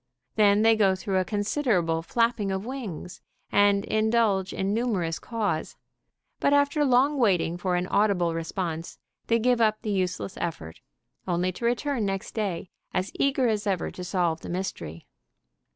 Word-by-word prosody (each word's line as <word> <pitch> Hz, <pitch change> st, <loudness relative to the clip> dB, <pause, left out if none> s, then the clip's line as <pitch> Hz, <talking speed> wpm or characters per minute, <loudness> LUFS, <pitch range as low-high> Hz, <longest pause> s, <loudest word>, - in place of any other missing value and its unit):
Then 210 Hz, 0 st, +4 dB
they 225 Hz, 0 st, +6 dB
go 195 Hz, -3 st, +3 dB
through 190 Hz, 0 st, -1 dB
a -, -, +2 dB
considerable 205 Hz, -, 0 dB
flapping 230 Hz, +2 st, 0 dB
of 190 Hz, +2 st, -3 dB
wings 225 Hz, -, -6 dB, 0.3 s
and 205 Hz, 0 st, +4 dB
indulge 215 Hz, -3 st, +1 dB
in 195 Hz, +1 st, -1 dB
numerous 200 Hz, -9 st, -1 dB
caws, 205 Hz, -9 st, -2 dB, 0.6 s
but 285 Hz, -, +2 dB
after 285 Hz, +1 st, +3 dB
long 275 Hz, +2 st, +3 dB
waiting 180 Hz, -7 st, +2 dB
for 180 Hz, 0 st, -1 dB
an 175 Hz, 0 st, 0 dB
audible 185 Hz, -4 st, +2 dB
response 165 Hz, 0 st, -4 dB, 0.3 s
they 230 Hz, -, +3 dB
give 240 Hz, +1 st, +2 dB
up 215 Hz, -1 st, +2 dB
the 215 Hz, -, -2 dB
useless 185 Hz, 0 st, -2 dB
effort, 80 Hz, -, -5 dB, 0.5 s
only 180 Hz, +1 st, 0 dB
to 235 Hz, -, -6 dB
return 245 Hz, +1 st, 0 dB
next 195 Hz, -1 st, -3 dB
day 195 Hz, -5 st, -3 dB, 0.2 s
as 185 Hz, +2 st, -1 dB
eager 270 Hz, -2 st, +1 dB
as 215 Hz, -2 st, -1 dB
ever 190 Hz, -3 st, -1 dB
to 180 Hz, -, -8 dB
solve 175 Hz, -3 st, 0 dB
the -, -, -8 dB
mystery. 175 Hz, -, -5 dB
200 Hz, 155 wpm, -26 LUFS, 180-230 Hz, 0.6 s, they